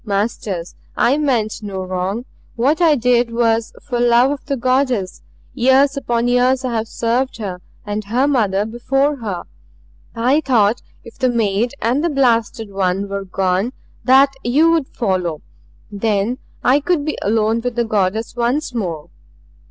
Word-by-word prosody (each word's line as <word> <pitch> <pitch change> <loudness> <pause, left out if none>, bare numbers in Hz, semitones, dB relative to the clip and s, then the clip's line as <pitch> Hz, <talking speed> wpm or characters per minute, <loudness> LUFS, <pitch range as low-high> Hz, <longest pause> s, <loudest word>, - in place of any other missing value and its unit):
"Masters 200 -4 -2 0.2
I 275 +5 +3
meant 235 -7 0
no 195 -3 -5
wrong. 185 +5 -3 0.3
What 280 +8 +1
I 320 -3 +5
did 245 -1 +2
was 230 -1 +1
for 245 - -3
love 240 +2 +4
of 285 - -5
the 280 -1 -1
Goddess. 255 -6 0 0.3
Years 270 +2 +3
upon 240 -3 -1
years 250 +1 +2
I 250 - -2
have 220 0 -1
served 240 +4 -1
her. 190 -5 -5 0.2
And 210 0 -3
her 245 +7 +1
mother 210 -8 +1
before 270 +6 0
her. 205 -7 -4 0.7
"I 255 +6 +2
thought 235 -5 +2 0.2
if 230 - -14
the 255 -1 +2
maid 230 +1 0
and 250 +7 +1
the 340 - +2
blasted 230 -6 +1
one 195 0 -1
were 200 0 -4
gone, 190 +5 -1 0.3
that 270 +3 +5
you 295 +8 +3
would 320 -5 +1
follow. 180 - -2 0.5
Then 210 +3 -1 0.2
I 270 +4 +4
would 340 -5 +1
be 310 - -2
alone 220 +2 +1
with 245 0 -3
the 240 -1 +1
Goddess 215 +1 -1
once 245 +4 -1
more. 170 -10 -4
235 Hz, 155 wpm, -18 LUFS, 205-260 Hz, 0.7 s, I